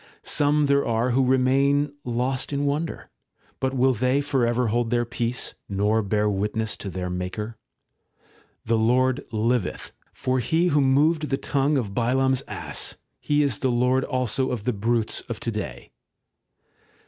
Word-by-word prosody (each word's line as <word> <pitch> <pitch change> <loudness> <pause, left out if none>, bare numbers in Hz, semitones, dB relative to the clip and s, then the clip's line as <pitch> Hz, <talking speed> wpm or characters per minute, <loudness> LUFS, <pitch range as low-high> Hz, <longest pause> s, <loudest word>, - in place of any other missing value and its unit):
Some 150 0 +2
there 140 0 +3
are 115 +2 0
who 130 +2 +3
remain 135 +3 +2
lost 125 +3 -2
in 140 0 -1
wonder; 150 +3 -2 0.5
but 130 0 -1
will 130 +1 +3
they 125 +4 +1
for 135 -4 +1
ever 120 0 +1
hold 120 +1 0
their 120 0 +1
peace, 120 +1 -2 0.2
nor 105 +3 +1
bear 105 +1 0
witness 105 +2 -1
to 100 - -6
their 90 -1 -4
Maker? 90 +5 -4 1.1
The 115 0 +2
Lord 130 +4 +2
liveth, 115 -1 -1 0.2
for 130 0 -1
He 165 +9 +2
who 145 -2 +3
moved 150 +4 +3
the 135 - +1
tongue 140 +2 +1
of 105 -7 -2
Balaam's 130 +3 +1
ass, - - -4 0.2
He 150 0 +1
is 135 -7 0
the 130 - +1
Lord 125 +2 +2
also 130 +1 0
of 120 -5 -3
the 125 - 0
brutes 110 +2 0
of - - -4
to - - -2
day. - - -6
125 Hz, 160 wpm, -24 LUFS, 115-135 Hz, 1.1 s, there